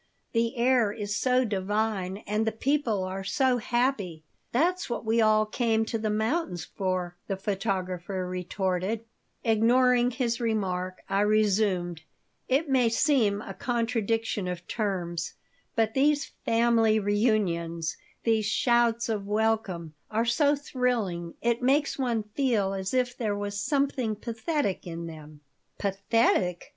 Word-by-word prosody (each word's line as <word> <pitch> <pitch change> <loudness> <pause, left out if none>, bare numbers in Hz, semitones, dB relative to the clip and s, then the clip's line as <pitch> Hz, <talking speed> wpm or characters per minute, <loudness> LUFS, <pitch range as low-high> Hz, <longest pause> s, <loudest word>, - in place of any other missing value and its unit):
"The 230 +2 0
air 240 -3 +3
is 205 -1 -4
so 255 +1 +2
divine 205 -1 -1
and 210 +2 0
the - - +2
people 230 -4 0
are 190 +1 -4
so 260 +4 +2
happy." 240 -9 -1 0.3
"That's 350 +8 +1
what 235 - -3
we 225 +1 +3
all 215 0 +4
come 225 0 +1
to 225 0 -2
the 215 0 -1
mountains 220 - -1
for," 185 -2 -3
the 195 - -2
photographer 190 -2 -2
retorted 185 +4 -2 0.4
Ignoring 245 +2 +4
his 245 -1 -1
remark, 185 -5 -2
I 195 +1 +1
resumed: 205 -5 +2 0.5
"It 280 +5 +2
may 255 -4 +3
seem 225 -5 +2
a - - -7
contradiction 225 -4 -1
of 180 -1 -5
terms, 180 -6 -2 0.4
but 220 -1 +2
these 290 +2 +2
family 225 -1 +3
reunions, 195 -6 0 0.3
these 220 -2 +2
shouts 235 -1 +2
of 210 -3 -2
welcome, 210 -6 0 0.2
are 225 +2 0
so 285 +5 +3
thrilling 240 - -2
it 235 0 +1
makes 280 +3 +2
one 235 -4 0
feel 225 -8 +1
as 190 +4 -3
if 250 -1 +1
there 215 -4 -1
was 205 0 -3
something 275 -6 0
pathetic 230 - -2
in 170 0 -5
them." 155 -2 -10 0.4
"Pathetic?" 195 -3 +1
220 Hz, 130 wpm, -27 LUFS, 190-240 Hz, 0.5 s, all